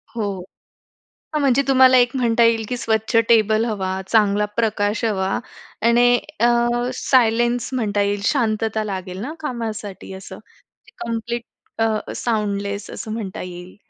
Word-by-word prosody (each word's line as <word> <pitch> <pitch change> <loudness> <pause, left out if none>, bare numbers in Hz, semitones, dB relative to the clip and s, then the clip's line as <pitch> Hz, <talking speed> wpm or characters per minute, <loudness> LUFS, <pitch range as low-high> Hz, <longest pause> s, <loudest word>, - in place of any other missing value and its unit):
हो. 225 - -2 1.1
हां, 305 - +1
म्हणजे 275 -1 +3
तुम्हाला 260 -1 +6
एक 245 +1 +3
म्हणता 235 -2 +2
येईल 230 -1 +3
की 250 - -2
स्वच्छ 220 0 -1
टेबल 220 -1 +4
हवा, 200 -5 -2 0.2
चांगला 210 -1 +3
प्रकाश 215 -1 0
हवा 195 -4 0 0.6
आणि 245 +1 +5 0.2
अ, - - +4 0.5
सायलेन्स 240 -1 +2
म्हणता 210 -5 0
येईल 200 0 0
शांतता 220 -4 0
लागेल 190 -3 -5
ना, 275 +8 -5
कामासाठी 220 -9 -5
असं. 190 0 -10 0.7
कंप्लीट 235 +1 -3 0.4
अ, 220 -1 -1
साउंडलेस 205 -3 -2
असं 215 - -7
म्हणता 210 -4 -5
येईल. 180 0 -9
220 Hz, 130 wpm, -21 LUFS, 205-240 Hz, 1.1 s, तुम्हाला